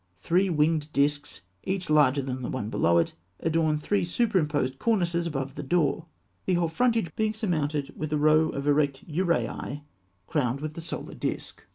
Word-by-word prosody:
Three 180 - +2
winged 155 -1 +1
discs, 145 +1 0 0.2
each 190 -1 -2
larger 145 -2 +4
than 130 -1 -4
the 125 - -4
one 115 -4 -3
below 85 0 +3
it, 85 - +2 0.3
adorn 160 -1 +1
three 195 +6 0
superimposed 155 - 0
cornices 175 -6 +1
above 135 -4 -3
the 150 - -6
door, 160 +2 +1 0.4
the 185 - +3
whole 170 -1 +1
frontage 225 -4 +1
being 215 0 0
surmounted 155 - -1
by 155 - -3
a 150 - 0
row 155 +1 +4
of 140 - -4
erect 145 -2 +1
uraei, 165 -3 -1 0.4
crowned 130 - 0
with 155 +1 -4
the 165 - -7
solar 170 +2 -6
disc. - - -4
155 Hz, 170 wpm, -27 LUFS, 145-175 Hz, 0.4 s, larger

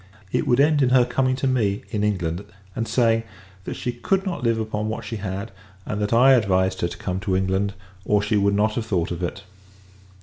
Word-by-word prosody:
It - - 0
would 120 - +3
end 150 +1 +4
in 130 - +4
her 125 -1 +5
coming 130 0 +1
to 130 - -3
me, 110 -6 0
in 105 -1 -1
England; 90 -3 -1 0.3
and 115 0 -2
saying, 115 -2 +2 0.4
that - - -4
she 125 - -3
could 190 +11 -1
not 175 -8 -3
live 115 -1 +2
upon 110 -1 -2
what 110 - -4
she 115 - -4
had, 100 +1 -5 0.3
and 105 0 -3
that 105 - -1
I 125 +4 +6
advised 95 -6 +2
her 85 - +2
to 90 - -8
come 95 -3 -3
to 95 -1 -1
England, 95 +1 0 0.3
or 105 +1 +2
she 105 - -1
should 100 -1 +3
not 105 +1 +2
have 115 0 -2
thought 90 -6 0
of 85 0 -4
it. 90 +2 -4
105 Hz, 225 wpm, -23 LUFS, 95-120 Hz, 0.4 s, I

